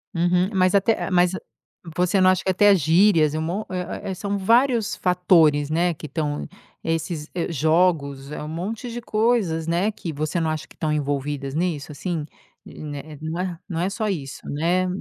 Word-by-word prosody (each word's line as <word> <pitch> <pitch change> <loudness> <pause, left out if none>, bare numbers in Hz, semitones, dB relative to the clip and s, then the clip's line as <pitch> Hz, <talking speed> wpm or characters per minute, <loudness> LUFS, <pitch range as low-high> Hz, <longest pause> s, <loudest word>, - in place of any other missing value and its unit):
Uhum 180 +2 +2
mas 185 0 +3
até 200 +2 +2
mas 180 -1 +3 0.7
você 180 +2 +2
não 185 - +6
acha 185 0 +2
que 190 - +3
até 205 +2 +5
gírias, 165 -1 +4
e 155 - -2
um - - -1
monte 180 +7 -3
ué 180 -1 -2 0.2
ué 190 - -3
são 200 +2 -3
vários 230 +2 +3
fatores, 165 -5 +3
né, 170 +2 +1
que 155 - -10
estão, 150 0 -3 0.4
esses 165 -1 -2 0.2
jogos, 155 -3 +1
é - - -5
um 150 - -6
monte 205 +10 -4
de 240 +1 -5
coisas, 215 -8 +1
né, 180 +6 +1
que 170 -5 -6
você 155 +4 -2
não 160 -1 0
acha 155 0 -3
que - - -19
estão 155 -2 -1
envolvidas 140 -1 -2
nisso 160 -4 -2
assim, 160 +1 -3 0.4
né 145 -2 -7 0.7
não 170 -3 -3
é 185 - +1
só 215 +2 -2
isso, 145 -9 -4
né, 175 +5 +1
170 Hz, 175 wpm, -23 LUFS, 155-190 Hz, 0.7 s, não